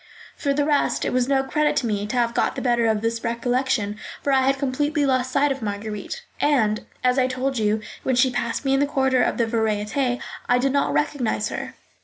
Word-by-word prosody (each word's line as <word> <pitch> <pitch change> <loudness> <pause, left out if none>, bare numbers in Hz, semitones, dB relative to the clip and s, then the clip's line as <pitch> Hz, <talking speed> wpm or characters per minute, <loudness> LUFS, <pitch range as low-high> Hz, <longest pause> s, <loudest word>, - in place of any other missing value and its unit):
For 285 - -1
the 285 +1 +1
rest, 290 -1 +1
it - - -1
was 250 -1 +2
no 270 -1 +2
credit 300 +3 +1
to - - +1
me 205 -2 -1
to 215 - -4
have 235 -1 +1
got - - 0
the - - -4
better 240 -2 +2
of 215 -1 +1
this 230 0 -2
recollection, 235 -2 0 0.3
for 280 - +1
I 265 - +4
had 275 0 +2
completely 290 +2 0
lost 255 -1 +1
sight 280 +2 +2
of 270 - -3
Marguerite, 210 - -5 0.2
and, 225 -8 +1 0.2
as 250 +1 +3
I 255 - +3
told 260 0 -2
you, 215 0 +1 0.2
when 260 - 0
she 255 +1 +4
passed 240 +2 -2
me 270 - +2
in 270 - +3
the 285 - +2
corridor 265 -3 +2
of - - +1
the 235 - +2
Variétés, 225 +3 0 0.3
I 245 - +5
did 265 +2 +1
not 280 - +1
recognise 215 - 0
her. - - -6
250 Hz, 225 wpm, -23 LUFS, 225-275 Hz, 0.3 s, I